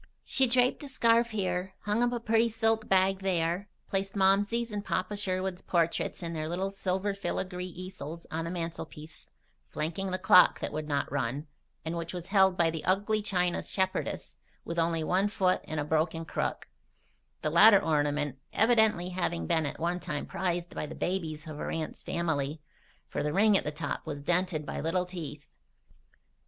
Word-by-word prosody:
She 265 -1 +3
draped 250 +1 +3
a 290 - -6
scarf 235 -3 +3
here, 190 -3 -2
hung 210 +3 0
up 245 0 +3
a 240 - -1
pretty 230 0 +2
silk 225 -1 0
bag 190 0 +3
there, 180 +1 0 0.2
placed 195 0 -2
Momsey's 205 +4 +2
and 205 -1 -3
Papa 185 +2 -2
Sherwood's 185 -2 -2
portraits 170 +1 0
in 170 0 -4
their 155 -1 -3
little 190 +3 -1
silver 195 +1 -1
filigree 185 -2 -3
easels 175 -3 -8
on 160 +1 -2
the - - -3
mantelpiece, 165 -2 -6 0.4
flanking 170 +5 -3
the 185 - -1
clock 180 -1 +6
that - - -4
would 155 0 -3
not 145 -3 -1
run 135 +1 -2 0.4
and 160 +1 -2
which 170 +1 -4
was 175 -1 -5
held 190 -2 +5
by 165 -1 +3
the 160 -1 -5
ugly 205 +4 +1
china 180 -4 0
shepherdess 190 -1 -2 0.3
with 170 0 -2
only 165 -1 +1
one 185 +5 +2
foot 185 -3 +1
and 155 - -3
a - - 0
broken 160 +2 0
crook, - - -3 0.8
the 155 - 0
latter 200 +6 +8
ornament 145 -5 0
evidently 220 -6 +3
having 175 - -1
been 160 - +1
at - - -6
one 175 +2 0
time 150 -5 -4
prized 175 -2 -2
by - - -4
the 160 - -8
babies 160 -4 -3
of 155 -2 -7
her - - -4
aunt's 160 -1 -4
family, 155 -3 -1 0.5
for - - -3
the 150 - 0
ring 205 +5 +4
at - - +3
the - - -2
top 150 -1 -4
was 145 - -4
dented 170 0 0
by - - -4
little 175 +4 0
teeth. 160 -5 -7
180 Hz, 180 wpm, -29 LUFS, 160-195 Hz, 0.8 s, latter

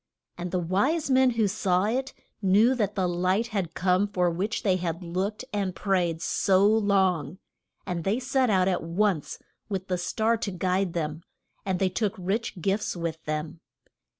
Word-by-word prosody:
And 175 +1 -5
the 185 - -1
wise 255 - 0
men 260 0 +5
who 230 -3 +1
saw 190 -2 +1
it 260 +5 -1 0.3
knew 205 +6 +4
that 210 -5 -1
the 190 -2 +1
light 185 +6 0
had 190 -7 -3
come 185 +2 +2
for 180 -3 +1
which 200 +8 -2
they 190 -4 +3
had 170 0 -3
looked 190 +7 -3
and 195 -3 -1
prayed 175 -3 0
so 195 0 +3
long, 190 -7 +2 0.5
and 175 -3 -3
they 200 +7 +1
set 260 -1 +1
out 190 -3 +3
at 185 -2 +1
once 175 -1 0 0.3
with 190 -2 -4
the 180 -1 0
star 220 +6 +1
to 220 -2 -3
guide 185 0 0
them, 155 -1 -3 0.5
and 190 -1 +1
they 190 0 +1
took 200 +2 -1
rich 195 +2 -2
gifts 195 +4 -1
with 165 -1 -4
them. 155 +1 -4
190 Hz, 175 wpm, -27 LUFS, 175-210 Hz, 0.5 s, men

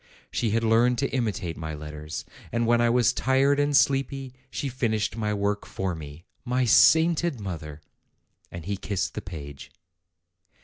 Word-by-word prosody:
She 115 - 0
had 115 +2 +1
learned 115 +2 +3
to 140 +3 -1
imitate 105 -9 -1
my 80 -1 -5
letters; 75 +1 -7 0.3
and 115 +1 0
when 120 +1 +3
I 120 - +3
was 125 +1 +3
tired 135 +3 +2
and 145 -1 +3
sleepy, 135 -1 +1 0.2
she 140 - -3
finished 115 -5 -1
my 105 -2 -1
work 105 0 -1
for 95 -2 -3
me. 75 +1 -9 0.2
My 125 0 +1
sainted 160 +4 +4
mother!" 80 -6 -6 0.7
And 85 -2 -8
he 100 0 -2
kissed 100 -1 -2
the - - -4
page. 70 -6 -9
115 Hz, 160 wpm, -26 LUFS, 85-130 Hz, 0.7 s, sainted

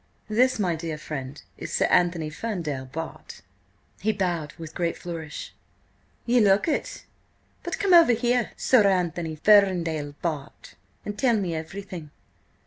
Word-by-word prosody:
"This, 255 +4 +3
my 180 -5 0
dear 160 -1 -4
friend, 145 -2 -6 0.2
is - - -6
Sir - - +2
Anthony 170 -3 +2
Ferndale, 160 -8 -4
Bart.!" 160 +5 -8 0.6
He 220 - +1
bowed 175 -7 -2
with 160 -1 -9
great 170 -1 -1
flourish. 165 -3 -7 0.7
"Ye 245 +1 +3
look 200 - +4
it. 310 - -2 0.6
But 345 - -4
come 395 -3 +2
over 335 -8 +8
here, 240 +1 +1
Sir 225 -6 +4
Anthony 175 -4 0
Ferndale, 165 -6 +3
Bart., 150 -4 -5 0.3
and 205 0 -5
tell 255 -4 +3
me 185 -5 -2
everything." 165 0 -7
175 Hz, 135 wpm, -25 LUFS, 160-215 Hz, 0.7 s, over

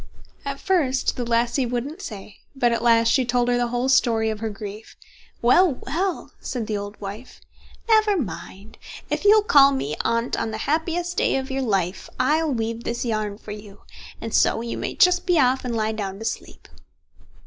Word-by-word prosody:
At 275 0 -4
first 285 -9 +1
the 245 - -3
lassie 235 +2 +1
wouldn't 255 +9 -4
say, 205 - -9 0.2
but 245 -3 +2
at 235 - 0
last 230 -1 +4
she 260 - +3
told 245 0 +1
her 245 - +2
the 245 0 +1
whole 245 +2 -1
story 230 -4 +3
of 215 - -5
her 220 0 -2
grief. 210 +1 -9 0.5
"Well, 295 +5 +5
well!" 360 +4 -2
said 240 -4 -4
the 215 - -3
old 205 +1 -6
wife, 205 +5 -8 0.5
"never 430 -3 +4
mind. 200 - -7 0.3
If - - -2
you'll 420 +1 +6
call 280 -8 +6
me 150 - -2
Aunt 230 +1 0
on - - -2
the 220 - -4
happiest 340 +3 -1
day - - +2
of 265 0 -3
your 270 0 -1
life, 195 -6 -1
I'll 315 0 +2
weave 230 -1 -3
this 240 +1 -3
yarn 215 -3 -2
for 210 - -10
you, 205 -1 -10 0.4
and 225 - -6
so 225 - +3
you 235 0 -4
may - - -4
just 360 -2 +4
be 355 -2 +3
off, 255 -1 +3
and 245 -2 -3
lie 220 -1 0
down 200 -3 -4
to 220 - -7
sleep." 230 - -6
240 Hz, 190 wpm, -23 LUFS, 220-275 Hz, 0.5 s, you'll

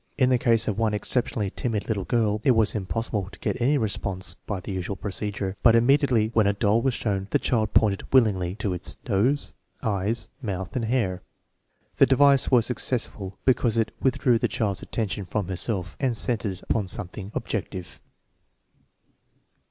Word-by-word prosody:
In 130 -2 +3
the 125 - +3
case 115 -2 +3
of 105 0 -1
one 110 -2 +1
exceptionally 105 -2 0
timid 115 -6 -3
little 100 -5 -2
girl, 110 -3 +1
it 130 - +4
was 110 -1 +3
impossible 100 0 -3
to - - -12
get - - -2
any 140 +5 +3
response 100 -5 -2
by 100 -3 -6
the 90 - -7
usual 95 +1 -3
procedure, 100 0 -4
but 115 -1 +6
immediately 120 -2 +3
when 110 -3 +3
a 100 - +3
doll 105 +2 +2
was 130 0 0
shown 100 -3 -2
the - - +3
child 110 -4 -1
pointed 100 -3 +2
willingly 100 -8 +3
to 105 -3 -2
its 90 - -2
nose, 120 +7 +1 0.3
eyes, 110 +1 0
mouth, 95 -2 -4
and 120 -3 -1
hair. 110 -7 0 0.8
The - - +6
device 140 0 +5
was 120 -4 +4
successful 110 -6 -2
because 120 -3 +2
it 115 - +1
withdrew 125 -2 +2
the - - +1
child's 100 -3 -1
attention 105 -3 -3
from 105 -2 -2
herself 95 -1 -3
and 130 -4 0
centered 105 -5 0
it 90 - -13
upon 105 -4 -1
some 90 0 -2
thing 100 +1 -8
objective. 90 -2 -5
110 Hz, 175 wpm, -25 LUFS, 100-120 Hz, 0.8 s, but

